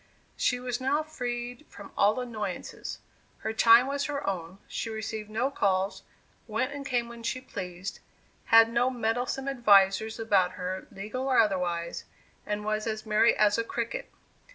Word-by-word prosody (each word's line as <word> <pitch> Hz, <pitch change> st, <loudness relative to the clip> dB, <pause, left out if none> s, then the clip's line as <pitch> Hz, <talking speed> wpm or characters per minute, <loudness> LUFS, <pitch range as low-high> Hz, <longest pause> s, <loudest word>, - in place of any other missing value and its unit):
She 245 Hz, -, +1 dB
was 245 Hz, 0 st, -3 dB
now 285 Hz, +4 st, +1 dB
freed 245 Hz, -2 st, -5 dB
from 200 Hz, -, -11 dB
all 210 Hz, +4 st, +3 dB
annoyances; 235 Hz, -4 st, -5 dB, 0.4 s
her 220 Hz, -, -2 dB
time 230 Hz, +2 st, +7 dB
was 280 Hz, +1 st, -1 dB
her 285 Hz, -1 st, -3 dB
own, 185 Hz, -1 st, -3 dB
she 230 Hz, -, -4 dB
received 220 Hz, -1 st, -5 dB
no 235 Hz, +6 st, 0 dB
calls, 195 Hz, -5 st, 0 dB, 0.5 s
went 240 Hz, +5 st, -1 dB
and 285 Hz, -1 st, -6 dB
came 245 Hz, -3 st, 0 dB
when 235 Hz, 0 st, -10 dB
she 230 Hz, +3 st, -2 dB
pleased, 185 Hz, -6 st, -6 dB, 0.5 s
had 225 Hz, 0 st, +6 dB
no 240 Hz, +2 st, +3 dB
meddlesome 245 Hz, +2 st, -1 dB
advisers 215 Hz, -4 st, +4 dB
about 195 Hz, -5 st, +2 dB
her, 185 Hz, 0 st, -5 dB
legal 215 Hz, +7 st, -4 dB
or 260 Hz, -, +3 dB
otherwise, 180 Hz, -5 st, +1 dB, 0.4 s
and 210 Hz, 0 st, -2 dB
was 215 Hz, +1 st, -1 dB
as 215 Hz, 0 st, -3 dB
merry 215 Hz, +2 st, +4 dB
as 210 Hz, +1 st, +4 dB
a -, -, +1 dB
cricket. 230 Hz, 0 st, -4 dB
225 Hz, 155 wpm, -28 LUFS, 205-245 Hz, 0.5 s, time